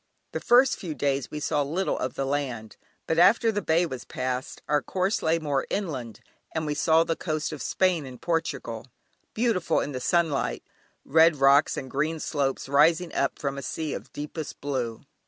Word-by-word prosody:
The - - -3
first 250 +2 +4
few 165 -5 -5
days 140 0 -1
we 150 - -5
saw 150 0 0
little 165 +7 -1
of 130 - -3
the 135 - -1
land, 130 -6 -3 0.3
but 160 - +1
after 225 +5 +5
the 205 -1 -2
Bay 170 0 +2
was 130 -6 -6
passed, 130 0 -4
our 150 0 +2
course 190 +7 -1
lay 160 +1 +2
more 145 -4 -1
inland, 135 - -4 0.3
and 160 -1 -1
we 150 - -1
saw 160 +2 +4
the 165 - -1
coast 155 -1 -2
of 150 - -6
Spain 185 -4 +1
and 125 -1 -10
Portugal, 140 -8 -2 0.5
beautiful 215 -8 +1
in 145 - -3
the 130 - -4
sunlight, 160 +1 0 0.4
red 160 +2 +5
rocks 140 +1 +4
and 130 - -4
green 155 +4 -1
slopes 140 -4 -1
rising 160 +5 +3
up 140 - 0
from 140 -1 -3
a - - -6
sea 155 +4 -3
of - - -7
deepest 150 +1 -6
blue. 125 -5 -3
150 Hz, 185 wpm, -26 LUFS, 135-165 Hz, 0.5 s, after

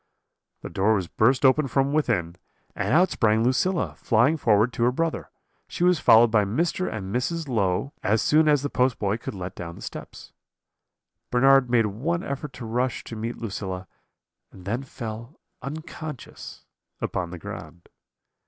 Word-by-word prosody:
The - - -7
door 105 +3 +2
was 95 -4 -2
burst 125 +9 +2
open 135 +2 +4
from 135 +2 +1
within, 105 - 0 0.4
and - - -2
out 180 +4 +4
sprang 110 -1 +2
Lucilla, 170 +9 +1
flying 120 +6 +2
forward 115 -4 +2
to 115 - -1
her 125 - +3
brother. 165 +5 -2 0.4
She - - -3
was 180 -3 +4
followed 115 -1 +6
by 105 -2 +4
Mr. 165 - -1
and 100 -3 -5
Mrs. 160 +5 -1
Low, 110 +2 0
as 110 +2 +2
soon 155 +1 +4
as 145 -2 +3
the 145 - -1
postboy 115 -5 +1
could - - -6
let 90 -1 -6
down 85 -1 -7
the - - -13
steps. - - -9 1.0
"Bernard 135 +1 +4
made 120 -2 +3
one 150 - -2
effort 140 -1 -5
to 120 - -8
rush 125 +3 -1
to 115 - -8
meet 115 +2 -4
Lucilla, 95 -4 -5 0.6
and 90 - -14
then 115 +6 -2
fell 115 0 -8 0.2
unconscious 155 -1 -8 0.3
upon 90 -2 -3
the 90 - -7
ground. 85 +1 -9
120 Hz, 160 wpm, -25 LUFS, 105-140 Hz, 1.0 s, followed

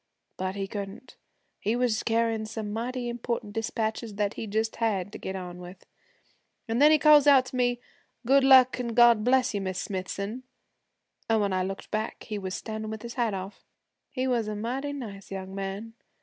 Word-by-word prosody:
But 185 +1 -3
he 195 -1 -2
couldn't, 200 +6 -7 0.4
he 215 +3 0
was 245 -3 +1
carryin' 225 -1 0
some 215 -1 -5
mighty 245 +2 -3
important 235 -3 -3
dispatches 220 0 -2
that 205 +1 0
he 225 - -6
just 220 +2 -1
had 205 -4 0
to - - -8
get 190 - -5
on 180 -1 -6
with. 180 +1 -11 0.8
An' 230 +1 0
then 295 +2 +8
he 310 - +6
calls 300 -1 +6
out 270 -3 +7
to 255 - -8
me, 245 -1 +1 0.5
"Good 270 +2 +5
luck 260 -1 +7
and 235 -2 -3
God 235 -2 +6
bless 255 0 +3
you, 200 - -1
Miss 185 -1 -3
Smithson!" 200 +4 -4 0.9
An' 225 -1 +3
when 200 -2 0
I 185 - +1
looked 195 +1 -5
back 215 +1 -3
he 210 -2 -4
was 190 -1 -4
standin' 220 -1 -5
with 220 0 -6
his 235 0 -6
hat 230 -5 0
off. 190 +2 -7 0.5
He 255 -2 -2
was 240 -4 +1
a 215 - -3
mighty 255 +7 -3
nice 215 -9 -7
young 190 -1 -6
man. 195 +3 -5
220 Hz, 190 wpm, -27 LUFS, 200-245 Hz, 0.9 s, then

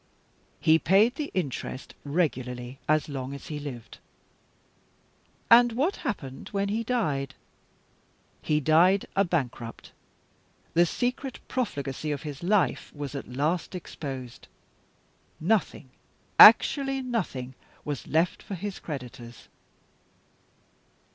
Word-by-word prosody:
"He 160 +1 +4
paid 200 +9 +4
the 295 +1 -4
interest 140 -6 -4
regularly 130 -5 -2
as 155 0 +3
long 135 -1 -5
as 140 - -10
he 150 -1 -4
lived." 130 -6 -8 1.5
"And 240 0 +7
what 295 - 0
happened 175 - -5
when 200 -1 -1
he 220 +3 -1
died?" 150 - -1 1.1
"He 150 -1 +1
died 170 +6 +4
a 195 - +4
bankrupt; 130 -10 -3 0.8
the 170 +1 +4
secret 250 +5 -2
profligacy 150 - -3
of 145 -1 -4
his 145 -3 -7
life 195 +2 +1
was 145 -1 -5
at 140 - -6
last 155 +8 -1
exposed. 135 -8 -7 0.9
Nothing, 170 - 0 0.5
actually 270 -2 +7
nothing, 155 - -3 0.3
was 145 -4 -4
left 165 +3 +1
for 200 - -6
his 200 +2 -5
creditors. 125 -5 -8
155 Hz, 110 wpm, -27 LUFS, 135-205 Hz, 1.5 s, And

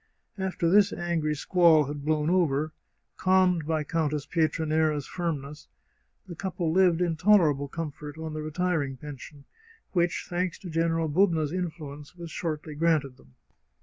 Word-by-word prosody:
After 190 -3 -1
this 200 +3 +5
angry 165 -3 -1
squall 165 -1 +4
had 145 0 -6
blown 150 0 +1
over, 155 -4 +1 0.4
calmed 185 -4 +3
by 160 -1 0
Countess 150 -2 -1
Pietranera's 155 -2 +1
firmness, 150 -4 -4 0.6
the 185 - -8
couple 175 -1 -2
lived 180 -1 +4
in 170 -2 +1
tolerable 160 -6 +4
comfort 150 -1 -6
on 160 -1 -5
the 155 - -4
retiring 155 -3 -1
pension, 145 +1 -10 0.5
which, 175 -2 0
thanks 180 0 -2
to 180 - -9
General 165 0 +1
Bubna's 160 -2 +2
influence, 155 -4 -6
was 170 -2 -8
shortly 155 -2 -4
granted 150 -4 +1
them. 65 -1 -22
160 Hz, 140 wpm, -27 LUFS, 150-175 Hz, 0.6 s, this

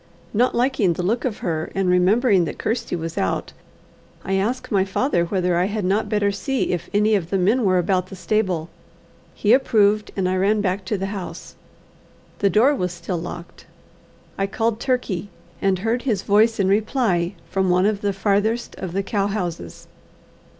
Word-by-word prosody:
Not 245 +4 +2
liking 240 -7 +2
the 175 - -4
look 225 +8 0
of 235 -5 -2
her, 160 -3 -2
and 195 -1 0
remembering 185 +2 +3
that - - -6
Kirsty 230 -3 -2
was 165 -1 -4
out, 95 - -2 0.7
I 195 - -2
asked 220 +8 -1
my 195 -3 +3
father 190 -1 0
whether 180 -1 0
I 175 +1 +2
had 205 0 -2
not 205 +3 +1
better 205 -1 +1
see 265 +6 -1
if 170 -1 -3
any 210 +1 +2
of 180 -5 0
the 195 - +1
men 210 +7 +2
were 185 -2 +3
about 185 +1 +1
the 190 - -9
stable. 185 -5 -1 0.6
He 210 +2 +3
approved, 215 -5 +3
and 190 -2 0
I 185 0 0
ran 205 +3 +2
back 190 -1 -1
to 210 +2 -1
the 195 - -3
house. 190 -3 -7 0.9
The 200 - +3
door 230 +10 +4
was 180 -10 -2
still 175 0 -4
locked. 170 0 -9 0.7
I 195 - +1
called 225 +2 -1
Turkey, 225 -8 -1 0.3
and 195 -1 +2
heard 225 +6 -1
his 215 -7 -1
voice 220 +2 +3
in 195 - +2
reply 200 -3 +1 0.2
from 190 -1 +1
one 180 +1 +3
of 205 -1 0
the 205 - 0
farthest 205 +4 0
of 185 -3 -5
the 195 +1 -1
cow 200 0 0
houses. 175 - -5
195 Hz, 185 wpm, -22 LUFS, 180-220 Hz, 0.9 s, door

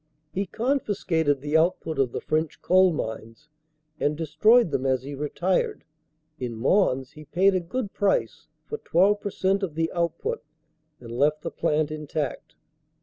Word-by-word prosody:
He 195 +1 -1
confiscated 190 - 0
the 145 +2 -2
output 160 -2 +1
of 130 -3 +2
the - - -4
French 155 0 -1
coal 185 0 +5
mines 115 0 -6 0.5
and 145 +1 0
destroyed 165 +7 +4
them 135 -2 -1
as 130 -1 +1
he 140 +2 -6
retired; 150 +6 -1 0.6
in 125 -3 -4
Mons 130 - +2
he 155 0 -13
paid 185 +6 +3
a 185 - +2
good 200 +5 -4
price 205 -2 0 0.2
for 445 - -5
12% 195 +1 +1
of 175 -6 -3
the 165 0 0
output 180 - -2 0.6
and 115 -2 -10
left 150 +5 +1
the - - -3
plant 150 0 0
intact. 150 -2 -4
160 Hz, 145 wpm, -25 LUFS, 145-190 Hz, 0.6 s, coal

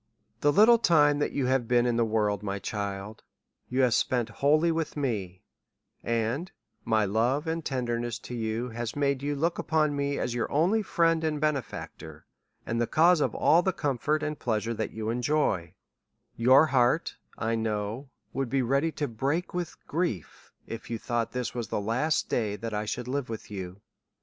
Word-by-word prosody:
The 145 - +3
little 225 +7 +6
time 150 -7 +4
that 145 - 0
you 140 - -1
haVe 130 -2 +1
been 120 0 +3
in 120 -1 +1
the 120 - +3
world, 105 -2 0
my 100 -1 -3
child, 100 +1 -5 0.5
you 130 +2 +1
have 125 -3 +4
spent 120 +1 +1
wholly 155 +4 +4
with 160 -2 -2
me; 100 -10 -3 0.6
and 115 +10 -1 0.3
my 110 -2 +2
love 120 - +1
and 165 0 -2
tenderness 120 -4 -2
to - - -8
you, 115 +1 -2
has 120 0 -5
made 140 -2 0
you 145 +1 -1
look 165 +4 0
upon 155 -2 +1
me 140 0 -1
as 120 - -2
your 120 -1 -2
only 180 +10 +3
friend 165 -4 +2
and 155 -2 0
benefactor, 135 - -4 0.4
and 115 +1 -1
the 120 - +1
cause 170 +1 +4
of - - 0
all 165 +3 +4
the 190 - +1
comfort 150 +1 -1
and 150 0 -3
pleasure 115 -1 -1
that 110 -1 -3
you 110 0 -3
enjoy: 120 - 0 0.6
your 130 +6 +6
heart, 130 +1 +2 0.2
I 115 0 -1
know, 110 +3 -2 0.2
would 135 -1 -2
be 135 0 +1
ready 140 +6 +1
to 145 - -2
break 140 +9 -2
with 175 -1 -3
grief, 150 - -3
if 115 - -8
you 115 - -2
thought 120 0 -2
this 125 -1 -3
was 120 -3 -4
the - - -2
last 130 +10 0
day 105 -4 -1
that 115 +1 -5
I 105 +1 -2
should 120 +3 -4
live 135 -1 -2
with 110 -1 -7
you. 95 -1 -7
125 Hz, 185 wpm, -28 LUFS, 110-150 Hz, 0.6 s, little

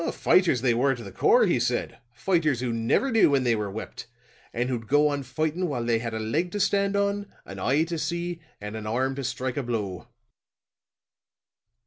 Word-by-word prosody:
Fighters 170 -10 +3
they 125 -2 +3
were 135 +3 +2
to 120 - -9
the - - -9
core, 470 +4 +4
he - - +2
said, - - -2
fighters 160 -9 +1
who 125 -2 -2
never 115 - +1
knew 225 -7 +5
when 140 -2 +2
they 120 -2 +3
were 105 -2 -3
whipped, 110 +4 -7 0.4
and 120 +2 -1
who'd 120 -4 -3
go 145 +3 +4
on 145 -1 -2
fighting 155 +7 -2
while 125 -5 -2
they 115 -1 +2
had 115 -1 -4
a - - -2
leg 150 +12 -1
to 205 - -2
stand 200 0 +1
on, 200 0 0 0.2
an 95 0 -9
eye 135 +10 +2
to 165 0 -4
see, 170 +2 -3 0.2
and 105 +1 -6
an 110 -1 -6
arm 130 +4 0
to 135 0 -5
strike 130 +1 -3
a - - +1
blow." 105 -7 -4
135 Hz, 200 wpm, -26 LUFS, 115-170 Hz, 0.4 s, knew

